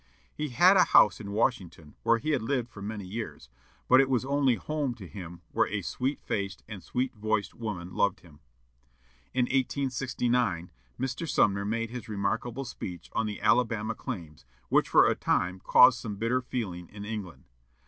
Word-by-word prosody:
He 150 0 -3
had 180 +10 +6
a 185 - +7
house 105 - +5
in 105 -2 -7
Washington, 95 - -1
where 115 - +3
he 155 +7 -2
had 145 - +1
lived 125 0 -1
for 100 - -11
many 105 -1 -5
years, 90 - -6 0.4
but 130 +1 +7
it 135 - 0
was 125 -2 +1
only 140 -2 +2
home 145 -2 -2
to 95 -6 -10
him 90 -2 -9
where - - +2
a - - -3
sweet 135 +3 -2
faced 100 -1 -3
and 105 -4 -8
sweet 125 +8 -2
voiced 105 -2 -1
woman 95 -6 -5
loved 100 -1 +1
him. 75 -4 -18 1.0
In 130 - +3
1869, 125 - 0 0.3
Mr. 130 +5 -3
Sumner 100 -1 +2
made 115 +2 -2
his 120 -3 -7
remarkable 110 +6 -2
speech 90 -8 -7
on 110 - 0
the 105 -2 -5
"Alabama" 110 -2 +2
claims, 85 - -7 0.3
which - - +3
for - - +6
a - - +3
time 90 +1 0
caused 125 +4 +6
some 105 -3 -5
bitter 115 +5 0
feeling 95 -9 -5
in 105 0 -9
England. 105 -5 -6
110 Hz, 175 wpm, -28 LUFS, 100-125 Hz, 1.0 s, a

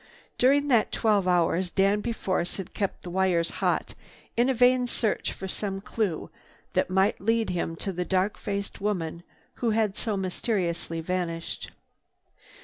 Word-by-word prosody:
During 285 +3 +4
that 235 -5 +4
twelve 210 -4 +2
hours 180 0 +2
Danby 200 +5 +2
Force 185 -5 -1
had 190 -3 -7
kept 200 -2 -2
the 175 - -6
wires 180 -2 +2
hot - - +1 0.4
in 240 +3 +3
a - - +3
vain 250 +1 +4
search 225 -3 0
for 190 - -6
some 195 0 -3
clue 195 -4 -2 0.4
that - - +1
might 190 +1 +2
lead 225 0 +1
him 170 -2 -2
to 195 - -3
the 180 +1 -1
dark 190 +3 +1
faced 200 -1 -4
woman 170 -5 -1 0.4
who 235 - +2
had 215 -3 +1
so 215 -4 -1
mysteriously 180 -3 -1
vanished. 170 -1 -3
195 Hz, 150 wpm, -27 LUFS, 180-220 Hz, 0.4 s, During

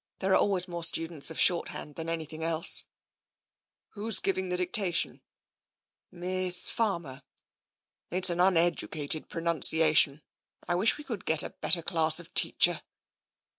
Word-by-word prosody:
'* - - -66
There 190 0 -1
are - - +5
always 190 -2 0
more 170 -1 -7
students 165 -2 -1
of 160 - -7
short 175 -2 +3
hand 150 - -9
than 165 +2 -6
anything 160 -1 -5
else." 165 0 +3 1.0
"Who's 220 +1 -2
giving 190 -1 -3
the 180 - -2
dictation?" 180 -2 -2 0.5
" - - -66
Miss 185 -1 +3
Farmer." 170 - -3 0.5
" - - -66
It's 185 0 +4
an 175 - -4
uneducated 165 -4 0
pronunciation. 160 -3 +2 0.4
I 175 - -1
wish 195 +7 +1
we 300 - -11
could 230 -9 -7
get 160 -1 +4
a - - -7
better 170 -2 +1
class 160 -1 +1
of 175 +1 -12
teacher." - - +2
170 Hz, 150 wpm, -27 LUFS, 160-185 Hz, 1.0 s, are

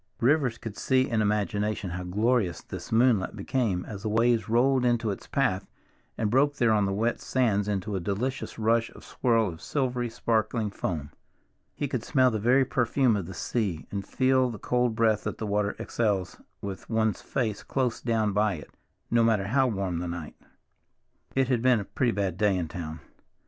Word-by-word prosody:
Rivers 130 -2 +2
could 110 -3 -8
see 130 -1 +2
in 115 -2 +1
imagination 105 -2 0
how 90 +1 -4
glorious 105 +1 +1
this - - -8
moonlight 115 -4 +3
became 100 -3 -1
as 100 -3 -7
the 110 - -2
waves 115 +1 +2
rolled 125 +3 +3
into 120 -3 +1
its 100 - -7
path 115 -9 0 0.5
and 105 -2 0
broke 145 +3 +3
there 120 -4 +3
on 105 -2 +3
the - - -1
wet 115 +5 0
sands 105 -6 +1
into 100 0 -2
a - - 0
delicious 110 +9 -3
rush 115 +1 +2
and - - -15
swirl 115 -3 +1
of 80 -2 -9
silvery 125 -4 -1
sparkling 110 -1 0
foam. 80 -7 -4 0.6
He 145 - -2
could 125 -3 -3
smell 130 -2 +3
the 110 - -1
very 125 +5 +4
perfume 125 -1 +2
of 95 -5 -3
the 95 - -8
sea, 100 -9 -2
and 100 -1 -3
feel 130 +4 +2
the 115 - -6
cold 125 +2 0
breath 110 -2 +2
that - - -3
the 110 - -4
water 105 0 0
exhales 100 -5 -1 0.2
with 100 -2 -6
one's 110 -1 +1
face 110 -6 -2
close 125 -4 -1
down 110 -3 +1
by 105 -1 +2
it, 75 - -11 0.4
no 115 0 +4
matter 105 -3 +2
how 135 +2 +3
warm 95 -6 -2
the 90 - -3
night. 85 -3 -6 1.0
It 135 -1 +3
had 125 -3 +1
been 125 -2 +4
a - - -7
pretty 120 +4 0
bad 100 -5 -2
day 105 -3 +3
in 85 -3 -3
town. 80 -2 -6
110 Hz, 190 wpm, -27 LUFS, 100-125 Hz, 1.0 s, very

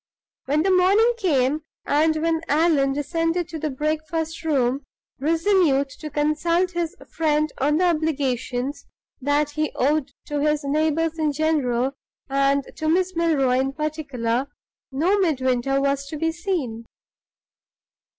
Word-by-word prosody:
When 295 +3 +1
the 385 - +2
morning 405 +6 +4
came, 295 - +1 0.2
and 315 +2 +2
when 330 -1 +1
Allan 295 -3 +3
descended 330 +4 -1
to 325 -2 -6
the 305 - -2
breakfast 315 +3 -3
room, 275 -3 +1 0.4
resolute 320 -2 +2
to 305 - -6
consult 310 +5 +1
his 340 -2 -3 0.2
friend 305 -1 +1
on 295 +3 +2
the 365 - +3
obligations 280 -5 -1 0.3
that 290 +2 +1
he 305 +1 -1
owed 285 +1 +1
to 295 -1 -3
his 300 0 +1
neighbors 315 +3 0
in 305 -1 +1
general, 275 -5 +1 0.4
and 275 +1 +2
to 315 - -1
Miss 370 +2 +1
Milroy 280 -7 +2
in 270 +1 -1
particular, 275 -5 -2 0.4
no 345 +10 +2
Midwinter 270 -6 +1
was 280 0 0
to 305 - -6
be 325 +2 0
seen. 320 - -3
305 Hz, 130 wpm, -23 LUFS, 275-325 Hz, 0.4 s, morning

